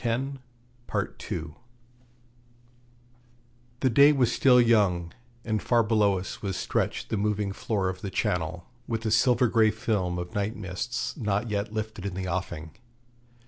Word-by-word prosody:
The 120 - -4 2.4
day 140 +4 +7
was 130 -5 +2
still 125 0 +5
young, 100 -8 +3 0.3
and 110 -2 0
far 120 -2 +3
below 105 -3 +3
us 90 - -6
was 95 -2 -3
stretched - - -2
the 110 - -1
moving 105 -1 0
floor 100 -2 -1
of 95 0 -4
the 100 - -4
Channel, 90 -1 -2 0.2
with 115 -1 -3
a 110 - 0
silver 125 +2 +4
grey 110 -1 +4
film 105 -5 -1
of 90 0 -5
night 105 +2 -1
mists 105 +5 -4
not 105 -2 -1
yet 105 0 -2
lifted 110 -2 -4
in 95 - -5
the 95 -1 -3
offing. 85 -3 -4
105 Hz, 140 wpm, -27 LUFS, 95-120 Hz, 2.4 s, day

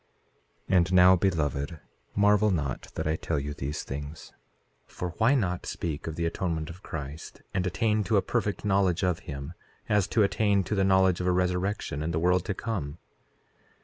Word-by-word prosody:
4:12 95 - +3
And 90 +1 +2
now, 90 0 +8
beloved, 80 -5 -1 0.4
marvel 105 +1 +4
not 75 -9 -2
that - - -3
I 80 +1 +1
tell 80 -2 -2
you 75 +1 -4
these 70 +1 -4
things; 70 +3 -7 0.5
for 90 - -5
why 120 +6 +4
not 90 -8 -1
speak 80 -3 -4
of 80 - -4
the 85 - -1
atonement 85 -2 -2
of 90 +3 -13
Christ, 75 -3 -7
and 95 0 0
attain 105 +3 +1
to 110 - +2
a 95 - +2
perfect 105 -5 -1
knowledge 95 -3 +2
of 90 -3 +1
him, 70 +3 -6 0.3
as 105 -2 +2
to 110 +1 +3
attain 100 -1 +2
to 105 - -3
the 95 -2 +2
knowledge 95 -2 +3
of 90 - -1
a - - +4
resurrection 90 -3 -1
and 80 +1 -2
the - - +1
world 90 +1 +2
to 100 - -2
come? 90 -11 -4
90 Hz, 185 wpm, -28 LUFS, 80-100 Hz, 0.5 s, now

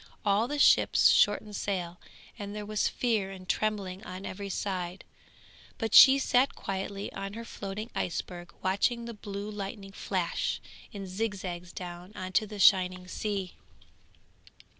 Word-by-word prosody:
All 205 +3 +3
the 295 +3 -3
ships 290 - +6
shortened 205 0 +3
sail, 180 -4 -3 0.4
and 205 0 -6
there 210 -1 -5
was 215 0 0
fear 220 -6 0
and 185 -1 -10
trembling 200 -3 -1
on 185 +1 -7
every 200 +1 -5
side, 185 -2 -3 0.7
but 225 - -3
she 270 +1 +10
sat 265 0 +2
quietly 195 +1 -4
on 195 0 -5
her 230 +1 -7
floating 210 +1 -6
iceberg 175 0 -4
watching 230 +5 +1
the 235 - -6
blue 205 0 -6
lightning 200 -1 -6
flash - - -2 0.3
in 200 -2 -6
zigzags 185 -3 -4
down 180 +2 -8
on 185 0 -5
to 215 +4 +2
the 210 0 -8
shining 185 -1 +4
sea. 195 -1 -3
200 Hz, 140 wpm, -29 LUFS, 185-215 Hz, 0.7 s, she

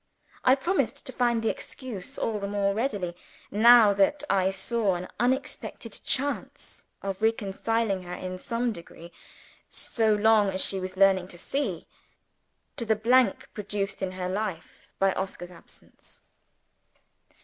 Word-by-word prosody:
I 255 - +6
promised 355 +8 -1
to - - -4
find 240 -3 +1
the 225 - +2
excuse 240 -9 -6
all 220 -2 -1
the 200 - -3
more 200 -1 0
readily, 205 -7 -2 0.4
that 220 +3 +6
I 190 -2 +3
now - - +3
saw 195 +1 0
an 180 +1 -5
unexpected 250 -3 -2
chance 280 +1 -3 0.2
of 195 0 -4
reconciling 220 -1 0
her 180 0 -7
in 185 0 -6
some 235 +3 -1
degree 170 -3 -11 0.6
(so 220 -2 0
long 210 -1 +4
as 190 0 +1
she 195 - 0
was 185 0 -6
learning 190 -2 +4
to 180 - -10
see) 280 +10 -3 0.9
to - - -2
the 220 0 +3
blank 235 0 +3
produced 200 -1 -4
in 185 -1 -2
her 185 -1 -3
life 190 -3 -4
by 195 -1 +3
Oscar's 185 -2 -5
absence. 175 - -15
205 Hz, 140 wpm, -27 LUFS, 190-230 Hz, 0.9 s, I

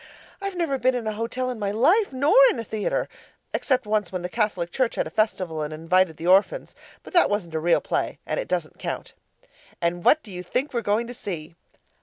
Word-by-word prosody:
I've 395 -1 -3
never 320 -6 -1
been 255 +1 +2
in 240 -2 -3
a 215 - 0
hotel 240 +4 -2
in 240 - -6
my 200 -1 -1
life, 315 - +3
nor 280 +6 +2 0.2
in 445 - -1
a 230 - -3
theatre; 215 -1 -2 0.5
except 260 -3 +1
once 210 -3 0
when 185 -2 -4
the 180 - -3
Catholic 185 -5 -1
Church 255 -3 0
had - - 0
a - - -7
festival 185 -7 0
and 150 0 -3
invited 165 +1 +1
the 165 - -7
orphans, 195 - +3 0.3
but - - -12
that 350 - +5
wasn't 195 -6 -2
a 160 - 0
real 170 +2 +3
play - - -2
and - - -2
it - - -3
doesn't - - -3
count. - - -5 0.7
And 175 0 -1
what 310 - +5
do 210 - -12
you 180 -1 -5
think 250 - -2
we're 235 - 0
going 215 +2 +1
to 245 - -7
see? 170 -9 -6
215 Hz, 225 wpm, -24 LUFS, 180-255 Hz, 0.7 s, that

